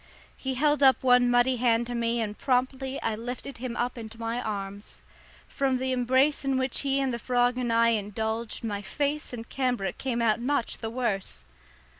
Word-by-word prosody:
He 265 -1 -3
held 295 +2 +2
up 265 -1 +5
one 250 -1 +5
muddy 245 +1 +3
hand 235 -1 +2
to 245 - -5
me, 235 0 0
and 210 -2 -3
promptly 260 +2 0
I 225 - 0
lifted 245 +3 -6
him 245 -1 -4
up 245 0 -2
into 225 0 -9
my 230 +1 -2
arms. 200 -2 -5 0.5
From 270 -2 0
the 260 +1 -2
embrace 260 +4 +2
in 270 -1 +1
which 260 -1 0
he 275 -1 +1
and 265 -2 0
the 235 - -3
frog 245 0 +2
and 240 -2 -1
I 230 0 +4
indulged 220 +1 -2
my 205 -2 -3 0.2
lace 290 +1 0
and 230 -2 -7
cambric 250 -7 -1
came 250 -3 -1
out 230 -1 +2
much 260 -1 -1
the 225 - -3
worse. 215 - -3
245 Hz, 190 wpm, -27 LUFS, 230-260 Hz, 0.5 s, up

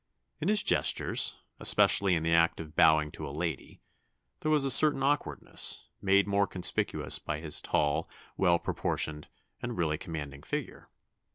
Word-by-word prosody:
In 160 - -3
his 210 0 +4
gestures - - +2 0.2
especially 95 -2 +4
in 80 - -2
the 80 0 0
act 85 0 +2
of 80 -1 -10
bowing 80 -1 +3
to - - -8
a - - -7
lady 80 0 -6 0.6
there 155 - -3
was 150 -3 +2
a 135 - +4
certain 145 -2 +4
awkwardness, 145 +2 -1
made 100 +1 +2
more 100 0 +1
conspicuous 90 -1 0
by 75 0 -5
his 80 -2 -2
tall, 75 -1 -1 0.3
well 90 -3 +2
proportioned, 75 -2 -3 0.3
and 120 -1 -5
really 80 -3 -1
commanding 75 -5 -7
figure. - - -6
85 Hz, 155 wpm, -29 LUFS, 75-100 Hz, 0.6 s, his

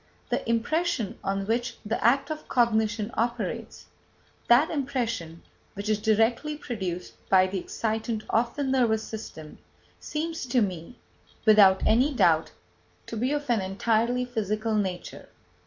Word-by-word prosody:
The - - -2
impression 245 - 0
on 195 0 -1
which 235 +3 -1
the 220 - -2
act 270 +7 +3
of 310 0 -6
cognition 220 -2 +1
operates, 235 -1 -3 0.6
that 250 +7 +5
impression 245 - -3 0.3
which 200 +2 -4
is 215 -1 +2
directly 225 +7 +1
produced 190 - -5 0.2
by 185 -1 +6
the 190 +1 -3
excitant 220 +2 -3
of 235 +1 +1
the 290 - -2
nervous 245 -5 +2
system, 160 -9 -9 0.4
seems 320 -2 -4
to 245 +1 +2
me, 185 +2 -3 0.5
without 200 -3 +6
any 260 +6 +3
doubt, - - +3 0.6
to - - -7
be 250 +5 0
of 295 0 -2
an 225 -4 +2
entirely 225 +6 0
physical 220 -2 -2
nature. 190 -4 -3
225 Hz, 135 wpm, -27 LUFS, 205-250 Hz, 0.6 s, by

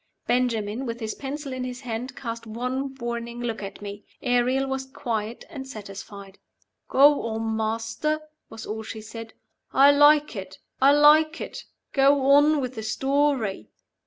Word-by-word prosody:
Benjamin, 240 -1 0
with 230 0 -4
his 220 -2 -3
pencil 280 0 -6
in 255 0 -4
his 250 0 -6
hand, 250 +1 -5
cast 230 -3 -6
one 255 +4 -3
warning 235 -1 -5
look 230 -3 -3
at 200 +1 -8
me. 205 0 -7 0.2
Ariel 250 +2 +2
was 265 0 -3
quiet 230 -4 -4
and 270 -4 -8
satisfied. 200 -3 -10 0.5
"Go 285 +2 +6
on, 225 0 -2
Master," 225 +8 -1 0.3
was 225 - -9
all 220 +1 -4
she 220 0 -7
said. 225 +1 -9 0.4
"I 280 +1 +7
like 295 -1 +5
it! 190 -1 -7 0.2
I 275 +1 +7
like 305 +2 +5
it! - - -7 0.3
Go 275 0 +4
on 290 +1 +5
with 255 -1 -3
the 220 - -6
story." 265 - 0
245 Hz, 155 wpm, -25 LUFS, 220-275 Hz, 0.5 s, I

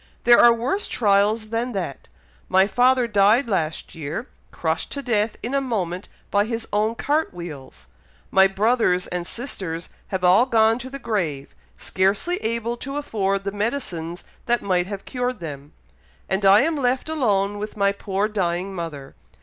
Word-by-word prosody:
There 240 0 +7
are 240 - +8
worse 250 - -1
trials 210 0 +2
than 235 +2 -2
that! 175 -9 -5 0.4
My 190 +1 +5
father 250 +3 +3
died 210 +5 +4
last 165 -7 -2
year, 160 - -5 0.3
crushed 160 -1 -2
to 280 - -5
death 215 -3 0
in 245 - -3
a 275 - +2
moment 190 -8 -3 0.2
by 205 0 +3
his 225 0 -4
own 215 +2 +1
cart 295 - 0
wheels, 155 - -9 0.5
my 190 0 +6
brothers 195 -2 +2
and 175 -1 -4
sisters 185 -10 -5 0.2
have 190 -2 -3
all 190 +8 +5
gone 225 -1 +3
to 255 +1 -7
the 275 - -6
grave, 175 - -3 0.2
scarcely 200 - 0
able 230 0 -2
to 275 +3 -5
afford 195 -8 -1
the 200 - -2
medicines 195 -6 -3 0.2
that 240 0 +1
might 180 -2 +1
have 200 -1 -6
cured 250 -1 -3
them, 145 -3 -8 0.6
and 190 +1 0
I 195 +2 +7
am 315 +2 0
left 255 0 0
alone 205 -10 0
with 210 +1 -6
my 200 -1 +3
poor 200 0 -1
dying 190 -2 -2
mother. 155 -6 -6
205 Hz, 165 wpm, -23 LUFS, 185-240 Hz, 0.6 s, are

